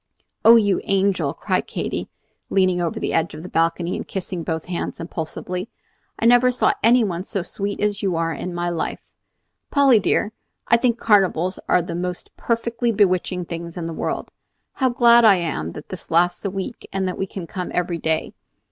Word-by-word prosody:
"Oh, 230 Hz, -, +9 dB
you 205 Hz, -4 st, +3 dB
angel!" 195 Hz, 0 st, +1 dB
cried -, -, -1 dB
Katy, -, -, -4 dB, 0.4 s
leaning 185 Hz, -2 st, +2 dB
over 170 Hz, -, -2 dB
the -, -, -2 dB
edge 165 Hz, -1 st, 0 dB
of 155 Hz, -, -9 dB
the -, -, -7 dB
balcony 170 Hz, +1 st, 0 dB
and -, -, -6 dB
kissing 185 Hz, -2 st, -4 dB
both 160 Hz, 0 st, -3 dB
hands 175 Hz, -1 st, -4 dB
impulsively, 180 Hz, +4 st, -5 dB, 0.5 s
"I -, -, -2 dB
never 245 Hz, +1 st, +6 dB
saw 250 Hz, -, +2 dB
any 235 Hz, +2 st, +5 dB
one 180 Hz, -4 st, -2 dB
so 195 Hz, -2 st, -3 dB
sweet 200 Hz, +2 st, -4 dB
as 205 Hz, 0 st, 0 dB
you 190 Hz, -4 st, 0 dB
are 165 Hz, 0 st, 0 dB
in 180 Hz, +4 st, -5 dB
my 175 Hz, 0 st, -1 dB
life. 165 Hz, -2 st, -3 dB, 0.7 s
Polly 275 Hz, -5 st, +5 dB
dear, 205 Hz, +1 st, +1 dB, 0.4 s
I 235 Hz, -, +5 dB
think 235 Hz, -1 st, +1 dB
carnivals 190 Hz, -5 st, +2 dB
are 180 Hz, -, +4 dB
the 175 Hz, -, -5 dB
most 180 Hz, +1 st, -5 dB
perfectly 230 Hz, 0 st, -1 dB
bewitching 185 Hz, -3 st, +1 dB
things 170 Hz, +1 st, -7 dB
in 170 Hz, -, -4 dB
the 165 Hz, -, -4 dB
world. -, -, -3 dB, 0.4 s
How 260 Hz, -2 st, +1 dB
glad 240 Hz, -1 st, +6 dB
I 215 Hz, -3 st, +7 dB
am 155 Hz, -, -3 dB
that 150 Hz, -, -10 dB
this 185 Hz, -, -8 dB
lasts 175 Hz, +1 st, +2 dB
a -, -, +1 dB
week, 195 Hz, +5 st, -6 dB
and 190 Hz, 0 st, -1 dB
that 185 Hz, -, -4 dB
we 195 Hz, -, -1 dB
can 185 Hz, -2 st, -7 dB
come 180 Hz, +1 st, -5 dB
every 175 Hz, -1 st, -1 dB
day. 160 Hz, 0 st, -1 dB
185 Hz, 190 wpm, -22 LUFS, 170-215 Hz, 0.7 s, Oh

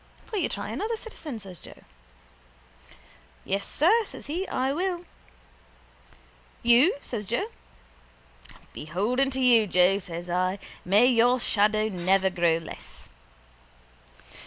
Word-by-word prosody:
—Will 425 Hz, -, -1 dB
you -, -, 0 dB
try -, -, -5 dB
another, 450 Hz, +2 st, -3 dB
citizen? 325 Hz, -, -7 dB
says 190 Hz, -6 st, -9 dB
Joe. -, -, -14 dB, 1.6 s
—Yes, 195 Hz, +1 st, -2 dB
sir, 425 Hz, +10 st, +3 dB
says -, -, -8 dB
he. 350 Hz, +6 st, -3 dB
I 265 Hz, +2 st, -1 dB
will. 355 Hz, +2 st, -2 dB, 1.6 s
—You? 240 Hz, +10 st, +5 dB
says 210 Hz, -5 st, -5 dB
Joe. 240 Hz, -, -1 dB, 1.2 s
—Beholden 210 Hz, -, -1 dB
to 265 Hz, 0 st, -3 dB
you, 230 Hz, -4 st, +5 dB
Joe, 180 Hz, +2 st, +3 dB
says 175 Hz, -2 st, -7 dB
I. 185 Hz, +2 st, 0 dB, 0.3 s
May 200 Hz, +6 st, +4 dB
your 245 Hz, 0 st, +4 dB
shadow 215 Hz, -1 st, +2 dB
never 190 Hz, 0 st, +1 dB
grow 170 Hz, -2 st, +2 dB
less. 165 Hz, -, -11 dB
225 Hz, 115 wpm, -26 LUFS, 185-275 Hz, 1.6 s, You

